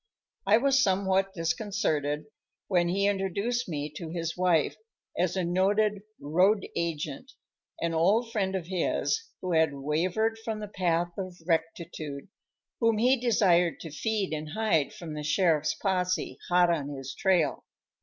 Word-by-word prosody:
I 210 +2 +6
was 270 +2 +3
somewhat 195 -1 +2
disconcerted 165 -5 -1 0.4
when 175 -3 +2
he 195 +3 +1
introduced 200 +4 -1
me 150 -2 -3
to 165 - -6
his 165 0 -3
wife 180 -4 +2 0.4
as 180 +1 0
a 185 - +1
noted 200 +4 +2 0.2
"road 185 +7 +2
agent" 160 - -3 0.5
an 170 0 0
old 205 +9 +2
friend 195 -3 -1
of 185 -3 -3
his 190 - 0 0.2
who 185 - -3
had 160 -3 +3
wavered 180 +11 0
from 220 -1 -3
the 210 - -5
path 175 -3 0
of 185 -2 -5
rectitude 165 -2 -3 0.5
whom 230 -2 +3
he 250 +4 +4
desired 195 -9 +2
to 160 - -7
feed 205 +2 -1
and 155 0 -5
hide 215 -9 +1
from 165 -3 -8
the 150 - -4
sheriff's 155 -1 +2
possè, 185 -2 -1
hot 175 -1 +4
on 145 -4 -1
his 135 -2 -6
trail. 185 -8 +1
180 Hz, 145 wpm, -28 LUFS, 160-205 Hz, 0.5 s, I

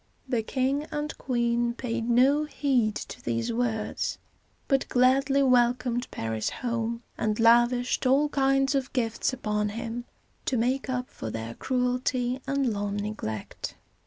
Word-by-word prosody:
The 245 -3 +1
king 265 +5 0
and 300 0 -3
queen 235 -1 0
paid 235 -2 -3
no 270 +5 +4
heed 255 -8 +1
to - - -7
these 115 - -1
words, 225 -2 -1 0.5
but 270 -2 +1
gladly 270 +2 +4
welcomed 245 -1 +2
Paris 110 -1 -2
home, 235 -1 -3 0.2
and 215 0 0
lavished 240 +2 +4
all 275 +3 +4
kinds 270 -1 +2
of 270 -2 -1
gifts 230 -1 0
upon 210 -4 -1
him 230 +2 -5 0.4
to 255 - +1
make 255 +4 0
up 250 0 -1
for 110 - -7
their 115 +1 -5
cruelty 250 - 0
and 275 -4 +1
long 205 0 -2
neglect. 205 - -4
245 Hz, 135 wpm, -27 LUFS, 225-265 Hz, 0.5 s, no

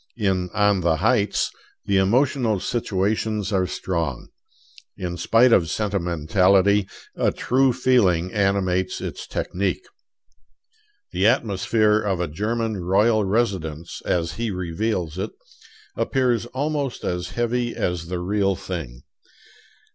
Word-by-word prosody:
In 95 -4 0
'On 105 -2 +3
the 85 -2 +2
Heights' 105 +4 +1 0.3
the 100 - +2
emotional 115 +2 +2
situations 105 0 -1
are 95 -1 +2
strong. 80 -11 -3 0.7
In 90 -2 -4
spite 115 +8 +4
of 80 -4 +3
sentimentality, 95 +1 +2 0.3
a - - +1
true 130 +1 +2
feeling 105 -9 +2
animates 95 -3 0
its - - -6
technique. 100 - -2 1.3
The 95 +3 +2
atmosphere 110 -2 +2
of 100 -4 -1
a 90 - -1
German 110 +6 -2
royal 105 +5 +2
residence, 95 -7 -2
as 85 -2 -1
he 115 0 -1
reveals 90 -1 -2
it, 105 +3 -3 0.6
appears 125 -3 0
almost 140 +1 -3
as 90 0 -2
heavy 120 0 0
as 85 -2 -2
the 90 +1 -3
real 100 +2 0
thing. 75 -11 -6
100 Hz, 115 wpm, -23 LUFS, 90-115 Hz, 1.3 s, spite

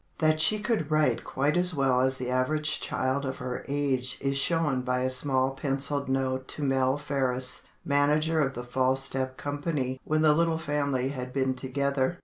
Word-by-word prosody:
That 155 -1 +2
she 215 - +3
could 210 -7 -1
write 155 -1 +2
quite 140 +3 0
as 180 -1 +6
well 135 -2 +2
as 130 0 +1
the 125 -1 -4
average 150 +4 0
child 130 +2 -1
of 130 -1 -4
her 125 -1 -5
age 135 -3 -1
is 135 0 -1
shown 150 -2 +1
by 125 0 -1
a 130 0 +1
small 130 0 +1
pencilled 140 0 -2
note 130 0 -1
to 150 - -5
Mell 135 0 +2
Faris, 130 -3 -1 0.2
manager 150 +3 +2
of 135 -2 0
the 120 - -5
"False 130 +2 0
Step" 130 -1 -3
Company 145 -3 -3
when 155 0 0
the 155 -1 +6
little 165 +1 +1
family 140 -5 -1
had 130 -2 -5
been 130 0 0
together. 140 +4 -1
135 Hz, 180 wpm, -27 LUFS, 130-150 Hz, 0.2 s, as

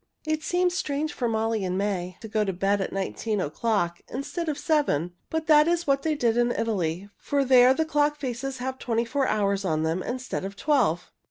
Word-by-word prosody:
It 310 0 -1
seemed 355 +2 +1
strange 300 -3 -2
for 240 -2 -1
Molly 220 -1 0
and 185 0 -1
May 185 -3 -2
to 225 - -7
go 215 0 0
to 195 - -1
bed 195 +2 0
at - - -3
nineteen 200 +2 -2
o'clock 175 +1 -1
instead 295 +5 -4
of 295 - -2
seven, 280 - +1 0.2
but 320 0 -2
that 305 -1 +6
was 340 0 +1
what 275 -1 +2
they 315 0 0
did 235 -4 +1
in 240 0 +3
Italy, 200 -5 -2
for 280 -1 0
there 255 -1 +7
the 320 - +1
clock 295 -1 +1
faces 265 -1 -4
have 260 +1 -4
twenty 230 -1 0
four 270 +3 0
hours 200 -2 +1
on 155 -4 0
them 165 +3 0
instead 255 0 -4
of 195 +1 -5
twelve. 195 - +1
235 Hz, 205 wpm, -26 LUFS, 195-290 Hz, 0.2 s, there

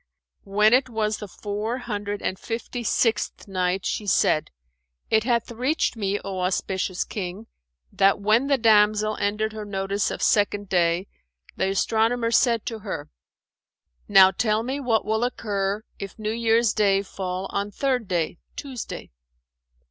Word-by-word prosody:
When 210 +3 +3
it 260 +1 +4
was 215 -2 -1
the 210 - -7
Four 210 +5 -4
Hundred 205 -4 -4
and 190 - -2
Fifty 235 +1 -5
sixth 225 -2 0
Night, 185 0 -1
She 210 - -2
said, 155 -4 +2 0.6
it 220 0 +3
hath 235 -2 0
reached 255 +5 0
me, 205 -2 -1
O 195 -1 -4
auspicious 185 0 -1
King, 195 +1 -6 0.5
that 195 0 +3
when 215 +6 +3
the 280 -1 +3
damsel 215 -2 +4
ended 215 +2 -1
her 215 -1 -6
notice 200 0 -1
of - - -4
Second 205 -1 +2
Day 175 0 +2 0.5
the 190 - 0
astronomer 225 +4 +1
said 235 -2 +3
to 225 -2 -4
her 195 - -6 1.0
"Now 190 -2 +7
tell 215 +2 0
me 265 +4 -3
what 235 -5 +1
will 220 +2 0
occur 205 -4 -2 0.2
if 195 -1 -7
New 215 -1 -2
Year's 230 -1 +2
day 200 -2 +2
fall 185 -1 -4
on 200 +1 -2
Third 250 0 -1
Day 175 -2 -1 0.2
(Tuesday)." 260 - -7
210 Hz, 150 wpm, -24 LUFS, 195-230 Hz, 1.0 s, Now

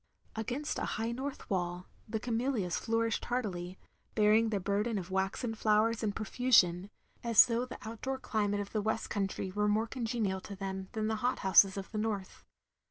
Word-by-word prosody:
Against 250 +7 -3
a - - -1
high 225 +2 -1
north 265 +3 -5
wall, 180 -1 -2 0.2
the 220 0 -1
camellias 230 -5 -1
flour 230 0 +1
ished - - -2
hardily, 190 -7 -3 0.4
bearing 215 +1 +4
their 205 -2 0
burden 205 +4 0
of 185 -1 -5
waxen 195 +5 -1
flowers 220 +1 +2
in 215 -2 0
profusion, 200 -5 +3 0.3
as 230 -2 +7
though 235 +1 -1
the - - -8
outdoor 260 +4 -4
climate 205 -5 -1
of 200 - -7
the 215 - 0
West 220 +1 -2
Country 195 -2 -2
were 210 +2 0
more 215 +2 +2
congenial 225 -5 -2
to 200 - -8
them 190 -1 -5
than 220 -2 -1
the 220 0 0
hothouses 195 -5 +4
of 195 - -6
the 215 - -2
North. 210 -3 -3
215 Hz, 175 wpm, -32 LUFS, 195-230 Hz, 0.4 s, as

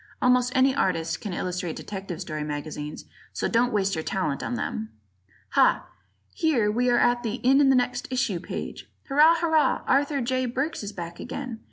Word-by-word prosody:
Almost 250 0 +3
any 260 +1 +4
artist 170 -10 0
can 205 - -5
illustrate 180 -2 -3
detective 190 -4 -6
story 155 -1 -4
magazines, 150 0 -5 0.3
so - - -1
don't 245 +1 +2
waste 195 -3 +1
your 160 - -2
talent 155 -7 -2
on 245 - -3
them. 220 -2 -3 0.6
Ha! - - +3 0.5
Here 245 -10 +2
we 245 +3 +1
are 240 - +4
at 240 0 +3
the 225 -2 -2
"In 270 +2 +6
the 265 - +5
Next 250 0 0
Issue" 215 -8 0
page. - - -7 0.2
Hurrah! 305 +4 +6
Hurrah! 320 -2 +2
Arthur 285 +1 +2
J. 255 +1 0
Burks 270 +7 -2
is 205 -1 -5
back 170 -3 -7
again! 250 -5 -6
240 Hz, 175 wpm, -26 LUFS, 180-260 Hz, 0.6 s, In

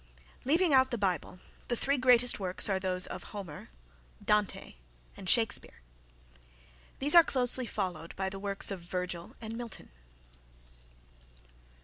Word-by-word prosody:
Leaving 325 +3 +2
out 260 0 +4
the 240 - -3
Bible 185 -3 -3 0.3
the 240 - -1
three 275 +3 -1
greatest 245 -2 +4
works 185 -2 +2
are 195 -2 -1
those 185 -1 +2
of - - -6
Homer, 190 -8 -9 0.6
Dante 210 -1 -1 0.4
and 185 - -7
Shakespeare. 225 - +2 1.2
These 285 +2 +5
are 340 -1 +9
closely 255 -3 +1
followed 185 -6 -5
by 190 0 -3
the 195 0 -7
works 200 0 0
of 195 - -5
Virgil 175 0 -6
and 225 0 -7
Milton. 235 - -9
205 Hz, 130 wpm, -29 LUFS, 185-250 Hz, 1.2 s, are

